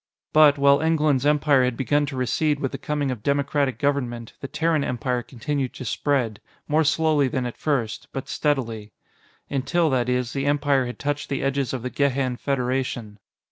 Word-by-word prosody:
But, 150 -2 +6
while 140 +1 +4
England's 150 -4 +2
empire 145 -2 +4
had 125 -2 0
begun 145 +3 +1
to 140 - -5
recede 145 +4 +1
with 135 - -2
the - - -6
coming 150 -5 -1
of 120 -5 -5
democratic 140 -1 0
government, 125 -5 -2
the 140 - -5
Terran 160 0 0
Empire 125 0 -1
continued 130 +2 -3
to 130 - -7
spread 120 -3 -1 0.3
more 155 +2 +3
slowly 155 -2 +2
than 130 0 -2
at 120 - -5
first, 125 -8 -2
but 135 - -5
steadily. 115 -8 -2 0.5
Until, 155 +4 +1
that 125 -2 +1
is, 125 -1 -1
the 140 0 -1
Empire 145 -3 +2
had 125 - -6
touched 145 0 -3
the 140 - -2
edges 135 -1 0
of 130 -3 -4
the 125 - -3
Gehan 135 -3 0
Federation. 125 -5 -2
140 Hz, 180 wpm, -24 LUFS, 125-145 Hz, 0.5 s, But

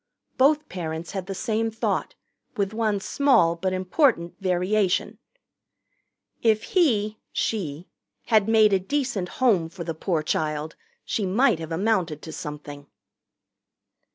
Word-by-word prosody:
Both 300 +3 +3
parents 160 -2 -5
had 190 -2 -5
the 195 - -4
same 225 +2 -1
thought, 225 0 -2 0.4
with 200 0 -1
one 220 -2 0
small 195 -8 +3
but 185 +2 -2
important 185 - +1
variation: 185 +1 0 1.2
"If 220 -2 +3
he 220 - +2
(she) 175 -6 -2 0.4
had 215 -3 +3
made 215 -2 +5
a 195 - +4
decent 250 -3 -2
home 200 -11 +3
for 170 +1 -7
the 165 - -3
poor 160 0 -1
child, 155 0 -2 0.3
she 205 -5 -1
might 205 -1 +3
have 160 0 -7
amounted 175 -4 0
to 160 - -7
something." 145 -2 -8
190 Hz, 125 wpm, -25 LUFS, 165-220 Hz, 1.2 s, made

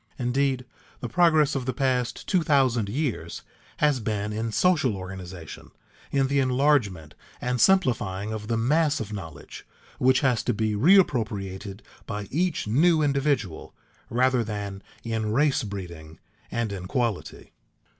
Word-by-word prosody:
Indeed, 130 +1 0 0.3
the 120 - -4
progress 155 +2 +3
of 135 -2 -3
the 130 - -1
past 125 -2 -1
two 185 -3 +2
thousand 130 -8 +2
years 135 +2 -3 0.3
has 150 -3 +2
been 105 -1 -2
in 110 +1 -2
social 145 - +2
organization, 95 -3 -9 0.4
in 135 -1 +2
the 140 +1 +1
enlargement 125 - +1 0.3
and 125 -1 -1
simplifying 110 - +2
of 105 -1 -6
the 115 0 0
mass 145 +6 +2
of 105 -1 -5
knowledge 80 -7 -9 0.4
which 130 +1 +4
has 130 -5 +2
to - - 0
be 110 0 0
reappropriated 105 - +2 0.3
by 105 -1 -4
each 175 +3 0
new 155 +8 +3
individual, 140 - -1 0.3
rather 125 0 +2
than 100 -2 -5 0.2
in 110 -2 -2
race 145 +2 +2
breeding 85 -7 -8 0.3
and 115 -2 -2
in 95 -2 -6
quality. 115 -2 -3
120 Hz, 135 wpm, -25 LUFS, 105-140 Hz, 0.4 s, which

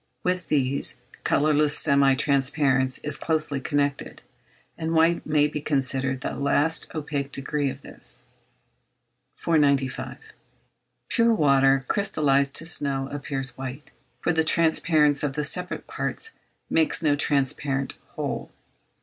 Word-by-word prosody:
With 180 -1 -1
these, 140 -2 +1 0.2
colourless 150 0 +3
semi 140 -1 +4
transparence 135 -1 +1
is 150 0 +1
closely 155 -3 0
connected, 145 -1 -2 0.5
and 165 0 -3
white 165 +1 +3
may 150 -1 +3
be 150 0 -5
considered 135 -2 0
the - - -4
last 145 +3 +1
opaque 145 -2 -3
degree 140 +1 -2
of 135 +1 -9
this. 125 - -5 1.1
495. 140 -5 0 0.9
Pure 230 -1 +2
water 135 -4 +3
crystallised 145 -9 +1
to 165 - 0
snow 140 -4 +1
appears 135 -2 -5
white, 135 +2 -7 0.3
for 170 - +1
the 160 0 +2
transparence 155 -2 +2
of 145 -2 -1
the 150 +1 -2
separate 180 +5 -2
parts 450 - -3 0.4
makes 160 0 +1
no 145 -2 +3
transparent 135 -1 0 0.2
whole. - - -4
145 Hz, 120 wpm, -24 LUFS, 135-155 Hz, 1.1 s, semi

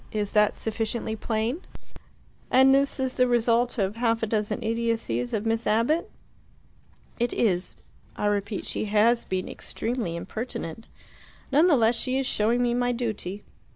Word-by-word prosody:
Is 210 -2 -2
that 210 -1 +3
sufficiently 220 0 -3
plain?" 225 - -2 0.9
"And 265 +1 +6
this 275 +1 +2
is 260 -1 -2
the 250 - +4
result 240 +1 +2
of 200 +1 -1
half 230 -1 +1
a - - +4
dozen 210 -1 -2
idiocies 225 - -1
of 215 - -2
Miss 225 +1 0
Abbott?" 230 +10 +2 1.1
"It 240 0 0
is. 180 -5 0 0.4
I - - -3
repeat, 205 0 -1
she - - -2
has 215 +3 +3
been 185 -1 -2
extremely 225 -8 -3
impertinent. 215 +1 -6 0.6
None 300 +6 +5
the 310 -6 +5
less 225 0 +4
she 255 +3 -1
is 270 - 0
showing 235 +2 +1
me 240 -1 +1
my 245 0 +1
duty. 215 -5 -3
225 Hz, 155 wpm, -26 LUFS, 210-245 Hz, 1.1 s, And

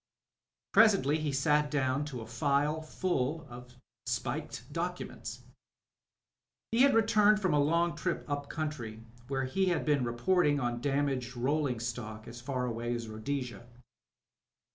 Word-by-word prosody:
Presently 195 -10 +5
he 150 -2 -1
sat 150 +2 +2
down 135 -1 0
to 130 -5 -6
a - - -7
file 140 +6 +1
full 155 -2 -1
of 125 +1 -11 0.3
spiked - - -3
documents. - - -4 1.3
He 230 +2 +3
had 275 -2 +6
returned 215 -1 +5
from 185 -6 +1
a 145 - +4
long 170 +4 +2
trip - - -2
up 145 -1 -3
country, 125 -9 -4 0.2
where 135 -1 -1
he 190 +9 +1
had 175 - +1
been 145 -4 +2
reporting 145 +6 +2
on 120 -2 -2
damaged 135 -3 -1
rolling 135 -1 0
stock, 110 -2 -5
as 120 +1 -9
far 125 0 -2
away 120 0 -2
as 115 -1 -5
Rhodesia. 120 0 -4
140 Hz, 140 wpm, -31 LUFS, 120-155 Hz, 1.3 s, had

